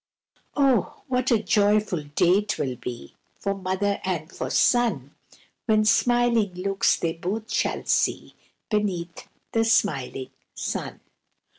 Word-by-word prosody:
Oh! 270 -8 +2
what 255 -1 0
a 235 - +5
joyful 205 -5 +2
day 180 +4 +4
'twill 145 -11 -2
be 120 - -7 0.3
For 200 - -1
mother 195 +1 -1
and 175 -3 -3
for - - -4
son, 210 - +2 0.5
When 215 -1 +3
smiling 235 -3 +3
looks 195 +2 +1
they 165 -1 -2
both 210 +8 -4
shall - - -1
see - - 0 0.4
Beneath 185 -5 -2 0.2
the 225 - +2
smiling 140 - 0 0.2
sun. - - -4
200 Hz, 120 wpm, -25 LUFS, 175-225 Hz, 0.5 s, a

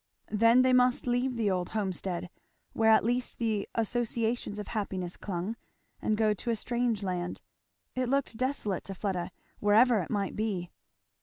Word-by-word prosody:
Then 230 +4 +5
they 255 0 +4
must 250 0 +4
leave 250 +1 +1
the 220 -4 +1
old 180 -1 -1
homestead, 185 -3 -2 0.4
where 225 0 +3
at 220 - +6
least 245 +2 -1
the 220 -4 -1
associations 230 -1 -1
of 210 - -6
happiness 190 -5 -3
clung, 195 +4 -4 0.4
and 215 - +1
go 215 -1 +3
to 220 +4 -5
a 230 - +2
strange 235 -1 -1
land. 180 -2 -3 0.5
It 255 -1 -1
looked 275 -3 0
desolate 240 -6 -1
to 195 - -5
Fleda, 185 -2 -2 0.3
wherever 220 +3 +5
it 175 - -4
might 200 -3 -1
be. 200 -5 -2
220 Hz, 160 wpm, -30 LUFS, 195-240 Hz, 0.5 s, at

